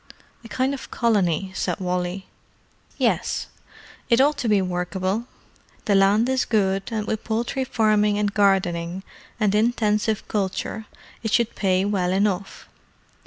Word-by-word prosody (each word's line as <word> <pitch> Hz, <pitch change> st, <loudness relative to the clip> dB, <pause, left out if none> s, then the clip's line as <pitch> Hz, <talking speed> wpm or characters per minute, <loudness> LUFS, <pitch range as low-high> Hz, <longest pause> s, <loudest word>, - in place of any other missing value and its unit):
"A -, -, -10 dB
kind 260 Hz, +4 st, 0 dB
of 275 Hz, -, -7 dB
colony," 195 Hz, -6 st, +1 dB
said -, -, -2 dB
Wally. 180 Hz, +1 st, -2 dB, 0.7 s
"Yes. -, -, 0 dB, 0.6 s
It 235 Hz, 0 st, +4 dB
ought 290 Hz, +3 st, +4 dB
to 235 Hz, -, -1 dB
be 210 Hz, -1 st, +4 dB
workable. 185 Hz, +4 st, -2 dB, 0.6 s
The 205 Hz, -, +2 dB
land 200 Hz, +4 st, +4 dB
is 260 Hz, -1 st, +1 dB
good, 195 Hz, -2 st, 0 dB
and 215 Hz, -2 st, -2 dB
with 215 Hz, 0 st, -3 dB
poultry 235 Hz, +4 st, -1 dB
farming, 215 Hz, -4 st, +2 dB
and 205 Hz, -1 st, 0 dB
gardening, 190 Hz, -3 st, +1 dB, 0.4 s
and 210 Hz, -3 st, +2 dB
intensive 215 Hz, -1 st, +1 dB
culture, 210 Hz, +2 st, -3 dB, 0.3 s
it 220 Hz, -, -3 dB
should 235 Hz, 0 st, +2 dB
pay 190 Hz, -1 st, +1 dB
well 190 Hz, -3 st, 0 dB
enough. 195 Hz, 0 st, -1 dB
205 Hz, 135 wpm, -23 LUFS, 190-220 Hz, 0.7 s, It